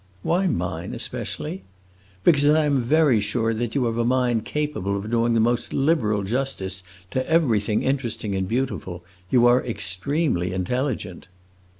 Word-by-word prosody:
"Why 185 +3 +1
mine 90 - -3
especially?" 95 - -4 0.6
"Because 145 -3 +5
I 155 0 +4
am 140 -3 +2
very 140 -2 +3
sure 115 +2 0
that 115 +2 -3
you 135 -3 +2
have 115 0 -1
a - - +2
mind 120 -2 +1
capable 145 -10 -2
of 105 +3 -5
doing 115 0 +2
the - - +3
most 120 +2 0
liberal 125 -9 +1
justice 100 -4 -2 0.3
to 130 - 0
everything 115 -10 +2
interesting 120 -6 -1
and 95 -1 -1
beautiful. 110 -7 -3 0.3
You 120 +1 +4
are 120 +1 +5
extremely 95 - -1
intelligent." 100 -1 -3
120 Hz, 145 wpm, -23 LUFS, 105-135 Hz, 0.6 s, Because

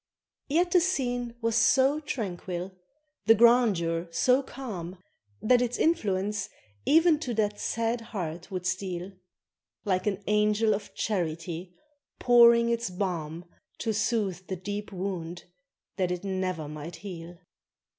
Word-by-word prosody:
Yet 345 +5 +2
the 360 - +6
scene 245 -9 -1
was 230 -1 0
so 265 +5 +4
tranquil, 185 - -4 0.6
the 225 - +8
grandeur 205 -8 +3
so 250 +10 +3
calm, 200 -10 -7 0.5
That 245 +2 +4
its 245 0 -1
influence 205 - 0 0.4
e'en 325 0 +5
to 250 -7 -3
that 210 -1 0
sad 230 +1 -1
heart 180 -7 -6
would 185 -2 -5
steal; 185 0 -3 0.7
Like 190 0 0
an 200 -1 -1
angel 210 +1 +3
of 205 - -6
charity 175 -2 -3 0.4
pouring 235 -1 +6
its 235 -2 -1
balm 175 -3 -3 0.3
To 225 -2 -1
soothe 205 -4 -1
the 190 - -3
deep 205 +3 -5
wound 180 -3 -4 0.5
that 185 -2 +1
it 180 0 -3
never 185 -5 -2
might 155 +3 -7
heal. 175 -3 -9
205 Hz, 125 wpm, -28 LUFS, 180-235 Hz, 0.7 s, the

